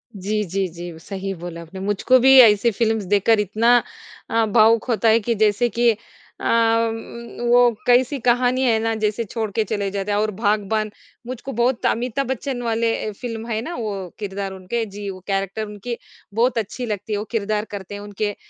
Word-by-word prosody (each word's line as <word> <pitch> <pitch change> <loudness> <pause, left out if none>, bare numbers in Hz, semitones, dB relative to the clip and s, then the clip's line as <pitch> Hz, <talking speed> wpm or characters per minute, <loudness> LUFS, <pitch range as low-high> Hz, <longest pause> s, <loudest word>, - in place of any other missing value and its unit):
जी, 210 +2 -1
जी, 190 +1 -2
जी, 175 +1 -8
सही 195 +2 -5
बोला 170 -1 -7
आपने। 190 +3 -10
मुझको 205 +6 +3
भी 265 +2 +7
ऐसी 220 0 +5
फ़िल्म्स 220 0 0
देखकर 205 +3 +3
इतना 225 +4 +3 0.5
अ, 225 0 +2
भावुक 220 +1 +4
होता 230 0 +1
है 225 +1 +5
कि 230 +2 -1
जैसे 215 +3 +2
कि 235 0 +3 0.5
अ, - - -5 0.4
उम्म, 235 +1 -7
वो 245 0 +6 0.2
कैसी 250 +3 +4
कहानी 250 +1 +3
है 230 -3 +3
ना? 225 0 0
जैसे 215 +1 -1
छोड़ 220 0 -4
के 220 +2 +1
चले 205 -1 -2
जाते 200 +1 -3
हैं 205 - +1
और 215 0 +1
बाग़बान 215 +1 0 0.4
मुझको 255 +2 -6
बहुत 240 +2 0
अमिताभ 250 +3 0
बच्चन 265 -1 -3
वाले 225 -1 0
फ़िल्म 230 0 -6
है 220 -2 -1
ना 340 +8 -6
वो 200 -5 -4
किरदार 195 -1 -4
उनके 190 +5 -3
जी 205 -1 -5
वो 185 -1 -7
कैरेक्टर 195 +2 -2
उनकी 210 +3 -6 0.4
बहुत 240 +2 +1
अच्छी 225 +3 -3
लगती 210 0 -4
है, - - 0
वो 210 - -4
किरदार 215 -1 -1
करते 200 0 -7
हैं 205 - -7
उनके 205 0 -3
215 Hz, 190 wpm, -21 LUFS, 200-235 Hz, 0.5 s, भी